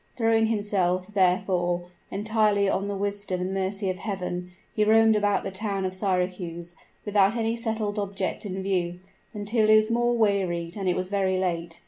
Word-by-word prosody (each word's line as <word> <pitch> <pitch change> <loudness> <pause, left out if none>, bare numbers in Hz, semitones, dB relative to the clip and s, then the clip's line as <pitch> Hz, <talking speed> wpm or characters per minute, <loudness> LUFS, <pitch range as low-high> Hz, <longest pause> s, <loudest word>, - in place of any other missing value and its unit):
Throwing 225 -1 +3
himself, 195 -4 0
therefore, 180 -2 +1 0.3
entirely 210 0 +1
on 195 +1 0
the 205 - -3
wisdom 200 -1 -2
and 185 +1 -2
mercy 195 +1 -2
of 185 -1 -2
Heaven, 180 -3 -4 0.2
he 215 - +2
roamed 220 +1 +5
about 205 -1 +1
the 195 - -4
town 195 0 -2
of 185 - -2
Syracuse, 180 -3 -2 0.3
without 205 0 +3
any 225 -1 0
settled 220 -3 -2
object 195 0 -3
in 190 -2 -4
view, 180 -2 -1 0.3
until 215 +1 0
he 215 - +7
was 215 +1 +3
much 240 +1 +2
wearied 185 -6 0
and 195 -3 -1
it 180 - +1
was 185 0 -3
very 190 -2 +1
late. 170 -2 -2
195 Hz, 170 wpm, -26 LUFS, 185-215 Hz, 0.3 s, he